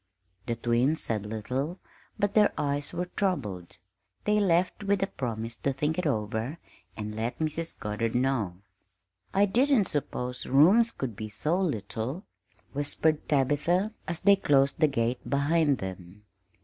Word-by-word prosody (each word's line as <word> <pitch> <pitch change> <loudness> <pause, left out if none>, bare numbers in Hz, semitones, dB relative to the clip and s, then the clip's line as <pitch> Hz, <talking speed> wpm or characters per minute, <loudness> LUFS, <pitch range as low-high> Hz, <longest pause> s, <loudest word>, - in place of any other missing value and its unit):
The 115 - 0
twins 120 +6 +1
said 105 -2 -2
little, 130 - -3 0.4
but 205 0 0
their 210 -1 +5
eyes 145 0 -1
were 180 - -2
troubled. 110 - -2 0.5
They 210 0 +2
left 185 0 +1
with 200 -1 +1
the - - +3
promise 115 - -3
to 140 - -1
think 150 +5 -1
it 180 - 0
over 110 +3 -2 0.4
and 105 0 -4
let 115 +3 -3
Mrs. 160 +1 -3
Goddard 110 +2 -2
know. 125 -8 +1 0.8
"I 200 +1 +4
didn't 245 +2 +3
suppose 125 -5 -3
rooms 185 - +6
could 125 - -5
be 110 +1 -6
so 155 - 0
little," 125 - -3 0.5
whispered 150 +2 +1
Tabitha, 150 - +2
as 170 -1 -2
they 200 +1 +6
closed 140 -7 +2
the 155 - +5
gate 120 -3 0
behind 145 +1 +2
them. 95 +1 -8
140 Hz, 145 wpm, -28 LUFS, 115-175 Hz, 0.8 s, rooms